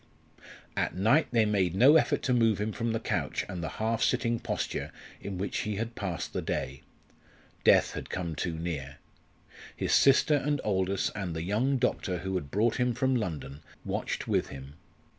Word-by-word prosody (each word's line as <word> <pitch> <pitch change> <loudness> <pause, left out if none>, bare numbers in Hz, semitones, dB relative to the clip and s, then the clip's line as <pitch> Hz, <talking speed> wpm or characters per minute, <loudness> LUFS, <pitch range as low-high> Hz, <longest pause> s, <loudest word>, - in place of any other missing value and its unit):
At - - -1
night 115 - +3
they 115 -3 +4
made 95 -4 +1
no 135 +9 +7
effort 160 - +3
to 125 - +1
move 115 -4 +3
him 105 +1 -1
from 115 +1 -2
the 115 - -1
couch - - -2
and 90 -2 -5
the 80 - -2
half 110 +1 0
sitting 115 0 +1
posture - - -3 0.3
in 100 -2 -5
which 95 +1 -2
he 105 -1 -2
had 115 +3 -3
passed 95 -7 -4
the - - -1
day. 65 +1 -3 0.8
Death - - +5
had - - -7
come 85 -3 -3
too 80 +3 -2
near. 75 -5 -4 0.8
His - - -1
sister 140 +3 +5
and 145 +1 0
Aldous 95 -1 0
and 95 -6 -4
the 80 - -3
young 115 +9 +1
doctor 110 -7 0
who 95 +2 -4
had 90 -7 -3
brought 110 +7 +1
him 125 -1 +1
from 130 +2 +1
London 75 - -4 0.2
watched - - -3
with - - +1
him. 70 +1 -9
105 Hz, 180 wpm, -29 LUFS, 90-115 Hz, 0.8 s, no